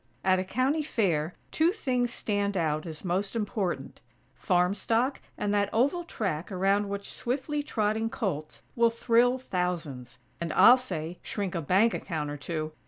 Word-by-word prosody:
At 185 -1 +3
a - - 0
County 255 +10 +1
Fair 180 - 0 0.2
two 320 +2 +3
things 250 - -1
stand 205 -3 -1
out 155 -1 0
as 160 +2 -8
most 190 +4 -1
important: 200 -9 -2 0.3
farm 180 +3 +2
stock 235 +6 0 0.2
and 205 0 -1
that 205 -1 +2
oval 285 +10 +2
track 190 - -3
around 195 +2 +1
which 200 0 -5
swiftly 280 +4 -2
trotting 220 -5 0
colts 155 - -4
will 235 -1 +4
thrill 235 +2 +3
thousands; 175 - -3 0.2
and, 170 -1 -3
I'll 245 - +8
say, 175 -9 -5
shrink 200 -3 -3
a 170 - -1
bank 195 +9 +3
account 155 -5 -3
or 145 - -5
two! 155 +1 -4
200 Hz, 160 wpm, -28 LUFS, 175-235 Hz, 0.3 s, I'll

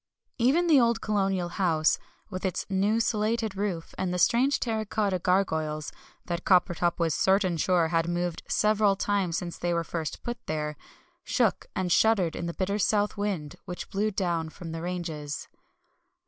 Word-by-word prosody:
Even 275 +9 +3
the 310 -5 +6
old 235 -2 +3
colonial 195 -5 0
house, 165 -4 +2 0.3
with 185 -1 -5
its 190 -3 -1
new 200 +4 +2
slated 220 -1 0
roof 195 -5 -3
and 185 -1 -1
the 180 - -1
strange 250 +9 +3
terracotta 215 -4 -1
gargoyles 160 -5 0 0.3
that 175 0 -3
Coppertop 175 -2 +3
was 165 -3 +1
certain 190 0 +2
sure 170 0 +2
had 165 0 +1
moved 175 -1 -2
several 210 -1 +3
times 195 -4 0
since 175 -1 -5
they 175 0 0
were 170 - 0
first 165 -2 -5
put 240 0 -3
up - - -49
there 150 -1 -2 0.5
shook - - +1
and 185 -2 -1
shuddered 190 -4 +3
in 170 - -3
the 170 - -5
bitter 200 +2 -1
south 210 0 +2
wind 195 -8 -3
which 180 -2 -7
blew 205 +2 +1
down 175 -5 -1
from 165 0 -9
the 165 0 -5
ranges. 165 -5 -4
185 Hz, 165 wpm, -27 LUFS, 170-210 Hz, 0.5 s, the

